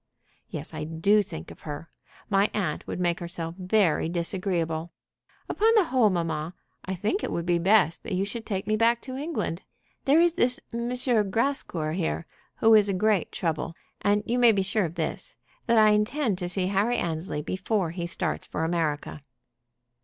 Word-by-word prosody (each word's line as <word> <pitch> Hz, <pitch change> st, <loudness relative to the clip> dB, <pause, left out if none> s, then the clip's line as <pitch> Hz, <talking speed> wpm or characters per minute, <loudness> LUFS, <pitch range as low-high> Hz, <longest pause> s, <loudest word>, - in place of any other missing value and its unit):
"Yes; -, -, -6 dB
I -, -, -4 dB
do 165 Hz, +7 st, +3 dB
think 80 Hz, -, -8 dB
of -, -, -13 dB
her. 150 Hz, +1 st, -7 dB, 0.4 s
My 200 Hz, 0 st, +3 dB
aunt 180 Hz, -8 st, -2 dB
would -, -, -4 dB
make 175 Hz, -1 st, +1 dB
herself 170 Hz, -1 st, -5 dB
very 185 Hz, -4 st, +2 dB
disagreeable. 170 Hz, -2 st, -2 dB, 0.5 s
Upon 445 Hz, +2 st, +3 dB
the 425 Hz, -, +6 dB
whole, 255 Hz, -8 st, +3 dB
mamma, 165 Hz, -2 st, -2 dB, 0.3 s
I 190 Hz, -, -3 dB
think 210 Hz, -, -1 dB
it -, -, -2 dB
would 170 Hz, -, -2 dB
be 175 Hz, -1 st, +2 dB
best 190 Hz, -2 st, +3 dB
that -, -, -4 dB
you 190 Hz, +2 st, 0 dB
should 225 Hz, +3 st, -5 dB
take 195 Hz, -3 st, -3 dB
me 215 Hz, -, +1 dB
back 230 Hz, +2 st, +2 dB
to 260 Hz, -1 st, -6 dB
England. 275 Hz, -, -3 dB, 0.4 s
There 285 Hz, +4 st, +5 dB
is 340 Hz, 0 st, +4 dB
this 250 Hz, -5 st, +1 dB
M. 235 Hz, +1 st, -2 dB, 0.4 s
Grascour 190 Hz, -, 0 dB
here, 170 Hz, -1 st, -2 dB, 0.3 s
who 225 Hz, 0 st, +5 dB
is 210 Hz, -2 st, +6 dB
a 195 Hz, -, 0 dB
great 210 Hz, -1 st, +1 dB
trouble, 165 Hz, 0 st, -2 dB, 0.3 s
and 205 Hz, 0 st, +2 dB
you 245 Hz, +2 st, 0 dB
may 240 Hz, -2 st, +7 dB
be 200 Hz, -3 st, +1 dB
sure 205 Hz, +1 st, +1 dB
of 165 Hz, 0 st, -6 dB
this, 175 Hz, -, -4 dB, 0.3 s
that 235 Hz, -1 st, +4 dB
I 215 Hz, -1 st, +7 dB
intend 210 Hz, 0 st, +1 dB
to 175 Hz, -2 st, -3 dB
see 185 Hz, 0 st, -1 dB
Harry 205 Hz, +5 st, +1 dB
Annesley 160 Hz, -2 st, -2 dB
before 185 Hz, 0 st, -1 dB
he 170 Hz, 0 st, -4 dB
starts 170 Hz, -2 st, -2 dB
for 160 Hz, -, -3 dB
America." 160 Hz, -3 st, -1 dB
190 Hz, 185 wpm, -26 LUFS, 170-220 Hz, 0.5 s, may